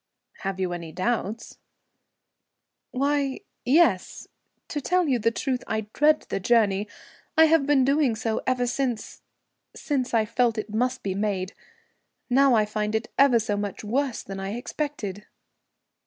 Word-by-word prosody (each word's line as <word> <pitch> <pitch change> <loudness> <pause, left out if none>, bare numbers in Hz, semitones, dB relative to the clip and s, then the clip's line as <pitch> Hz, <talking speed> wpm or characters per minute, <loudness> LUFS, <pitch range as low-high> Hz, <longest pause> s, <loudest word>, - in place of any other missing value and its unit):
"Have 195 -1 -4
you 185 -2 -1
any 170 -2 -6
doubts?" 220 +3 -3 1.3
"Why, 280 +3 0 0.2
yes. 255 - +2 0.4
To 295 - -3
tell 360 +3 +1
you 255 -4 +2
the 230 +1 +2
truth, 250 +2 -2
I 220 0 -1
dread 300 +1 +3
the - - -1
journey. 210 -1 +2 0.5
I 320 - +8
have 315 -3 +3
been 275 -3 +4
doing 275 -3 +2
so 220 0 -2
ever 255 -1 +1
since 245 -2 -3 0.5
since 265 -4 -2
I 220 -1 +3
felt 230 +1 +1
it 215 0 -4
must 250 +3 0
be 195 - -1
made. 195 -1 -2 0.8
Now 270 0 +5
I 215 -1 +3
find 210 0 -2
it 220 0 -2
ever 275 -3 +6
so 215 -2 -1
much 205 0 -4
worse 255 +3 -1
than 195 0 -7
I 195 +1 -4
expected." 235 -6 -5
235 Hz, 150 wpm, -25 LUFS, 210-275 Hz, 1.3 s, I